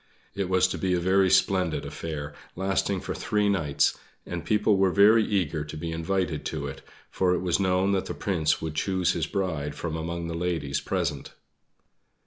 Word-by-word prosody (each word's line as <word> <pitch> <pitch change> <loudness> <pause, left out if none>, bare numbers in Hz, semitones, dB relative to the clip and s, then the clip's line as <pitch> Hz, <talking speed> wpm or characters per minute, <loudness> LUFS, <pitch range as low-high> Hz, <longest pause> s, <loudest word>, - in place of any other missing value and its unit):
It 100 -2 -2
was 95 0 +4
to - - -4
be 95 -1 +1
a - - +1
very 95 +2 +3
splendid 95 -3 +2
affair, 75 -3 -5 0.2
lasting 95 0 0
for - - -4
three 105 -1 0
nights, 75 -7 +1 0.3
and 85 -1 -5
people 105 -1 +2
were 95 0 +4
very 105 +4 +6
eager 85 -8 0
to 75 +1 -8
be 80 +1 -4
invited 85 -1 -1
to 75 -3 -3
it, 70 -1 -7 0.3
for 90 -1 +2
it - - -2
was 90 0 +1
known 95 0 +2
that 95 -1 0
the - - -4
Prince 85 -7 0
would 80 -1 -3
choose 90 +2 +1
his 80 -3 -1
bride 80 -7 -2
from 80 +1 -4
among 85 +1 -4
the 85 - -4
ladies 80 -5 -2
present. - - -3
90 Hz, 185 wpm, -26 LUFS, 80-95 Hz, 0.3 s, very